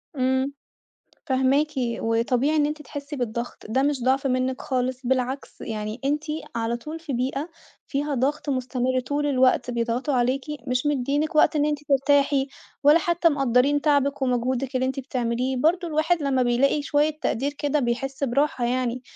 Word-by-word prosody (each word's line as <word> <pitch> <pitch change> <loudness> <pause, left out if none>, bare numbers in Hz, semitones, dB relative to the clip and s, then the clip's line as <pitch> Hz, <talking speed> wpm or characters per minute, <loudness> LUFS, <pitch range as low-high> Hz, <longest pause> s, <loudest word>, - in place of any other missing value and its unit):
امم، 260 +1 +1 0.7
فاهماكِ، 270 +3 +2
وطبيعي 240 +3 +1
إن 300 -1 +3
أنتِ 300 +1 -3
تحسّي 285 +1 -7
بالضغط، 240 -2 -4
ده 260 +4 +2
مش 280 -3 0
ضعف 265 +2 +2
منِّك 255 0 0
خالص، 255 0 -2
بالعكس، 260 +1 -2
يعني 215 +1 -4
أنتِ 295 +2 0 0.3
على 230 0 -1
طول 305 +7 -7
في 320 -4 -5
بيئة 270 +6 -2 0.4
فيها 290 +1 -2
ضغط 285 +4 -1
مستمر 255 -1 0
طول 285 +4 -2
الوقت، 255 -2 +2
بيضغطوا 235 +4 -1
عليكِ، 255 +2 +1 0.3
مش 250 +2 0
مِدّيينِك 290 +2 0
وقت 305 - +4
إن 295 -1 +2
أنتِ 300 -1 0
ترتاحي، 280 0 +3 0.4
ولا 295 +4 +7
حتى 340 0 +2
مقدّرين 275 0 +2
تعبِك 285 -2 +2
ومجهودِك 255 +1 0
اللّي 255 0 +1
أنتِ 265 +1 -2
بتعمليه، 255 0 -2
برضه 340 +6 +2
الواحد 315 +1 +1
لمّا 265 -2 +2
بيلاقي 265 +5 +2
شويّة 290 +1 +2
تقدير 275 +5 0
كده، 290 +1 0
بيحسّ 270 +2 -2
براحة 275 -1 +1
يعني، 250 0 -1
265 Hz, 155 wpm, -24 LUFS, 250-290 Hz, 0.7 s, ولا